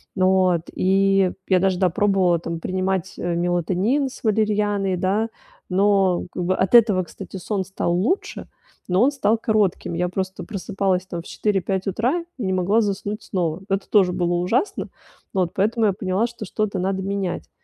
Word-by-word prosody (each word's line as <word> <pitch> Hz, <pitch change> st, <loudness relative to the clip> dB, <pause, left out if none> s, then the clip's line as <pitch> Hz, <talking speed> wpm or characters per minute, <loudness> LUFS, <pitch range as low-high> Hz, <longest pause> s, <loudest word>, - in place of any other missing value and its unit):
Вот. 185 Hz, -2 st, +3 dB
И 195 Hz, 0 st, +3 dB, 0.2 s
я 185 Hz, -1 st, +4 dB
даже, 190 Hz, -1 st, +1 dB
да, 185 Hz, -, +3 dB
пробовала, 190 Hz, -2 st, +2 dB
там, 165 Hz, 0 st, -5 dB
принимать 190 Hz, +1 st, -2 dB
мелатонин 175 Hz, -, 0 dB
с -, -, -13 dB
валерианой, 205 Hz, -3 st, +1 dB
да. 205 Hz, +5 st, 0 dB, 0.4 s
Но 195 Hz, -1 st, +2 dB
как 180 Hz, -, -4 dB
бы 185 Hz, +2 st, +1 dB
от 190 Hz, +4 st, +2 dB
этого, 210 Hz, -6 st, +6 dB
кстати, 190 Hz, +2 st, -9 dB
сон 195 Hz, +1 st, -2 dB
стал 185 Hz, -2 st, -2 dB
лучше, 220 Hz, -, -1 dB, 0.4 s
но 180 Hz, +2 st, +3 dB
он 280 Hz, -, +4 dB
стал 230 Hz, -5 st, +1 dB
коротким. 215 Hz, -6 st, 0 dB
Я 175 Hz, +1 st, -1 dB
просто 190 Hz, 0 st, -4 dB
просыпалась, 190 Hz, -2 st, -1 dB
там, 175 Hz, -2 st, -5 dB
в -, -, -19 dB
4-5 195 Hz, -2 st, -1 dB
утра 250 Hz, -, 0 dB
и 235 Hz, -, -4 dB
не 190 Hz, -, 0 dB
могла 190 Hz, +5 st, +2 dB
заснуть 205 Hz, +1 st, -3 dB
снова. 175 Hz, -2 st, -2 dB
Это 195 Hz, 0 st, -1 dB
тоже 190 Hz, -4 st, +4 dB
было 175 Hz, 0 st, 0 dB
ужасно. 195 Hz, -, 0 dB, 0.4 s
Вот 180 Hz, -3 st, 0 dB
поэтому 220 Hz, +3 st, +1 dB
я 200 Hz, -, +3 dB
поняла, 190 Hz, +3 st, 0 dB
что, 235 Hz, -2 st, -9 dB
что-то 210 Hz, 0 st, -2 dB
надо 190 Hz, +1 st, -1 dB
менять. 195 Hz, -2 st, -3 dB
190 Hz, 165 wpm, -22 LUFS, 180-210 Hz, 0.4 s, этого